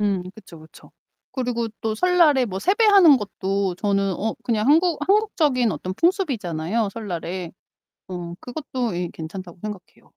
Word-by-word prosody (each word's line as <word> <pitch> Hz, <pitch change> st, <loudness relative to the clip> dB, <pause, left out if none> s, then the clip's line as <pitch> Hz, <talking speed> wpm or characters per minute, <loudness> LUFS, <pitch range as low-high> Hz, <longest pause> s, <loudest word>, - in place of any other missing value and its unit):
음 200 Hz, -3 st, 0 dB
그쵸, 190 Hz, -6 st, -13 dB
그쵸. 160 Hz, +1 st, -17 dB, 0.4 s
그리고 245 Hz, -3 st, -2 dB
또 220 Hz, -1 st, -1 dB
설날에 325 Hz, -3 st, +4 dB
뭐 190 Hz, -5 st, -4 dB
세배하는 390 Hz, -, +6 dB
것도 195 Hz, -3 st, -2 dB
저는 195 Hz, -1 st, 0 dB
어 220 Hz, +5 st, -2 dB
그냥 220 Hz, -2 st, 0 dB
한국 325 Hz, +3 st, +4 dB
한국적인 315 Hz, -, +2 dB
어떤 185 Hz, +1 st, -5 dB
풍습이잖아요, 225 Hz, -, 0 dB
설날에. 180 Hz, -4 st, -5 dB, 0.6 s
어 175 Hz, -2 st, -6 dB
그것도 250 Hz, -, -4 dB
예 175 Hz, 0 st, -2 dB
괜찮다고 175 Hz, +2 st, -8 dB
생각해요. 210 Hz, -4 st, -9 dB
215 Hz, 320 characters per minute, -23 LUFS, 185-290 Hz, 0.6 s, 세배하는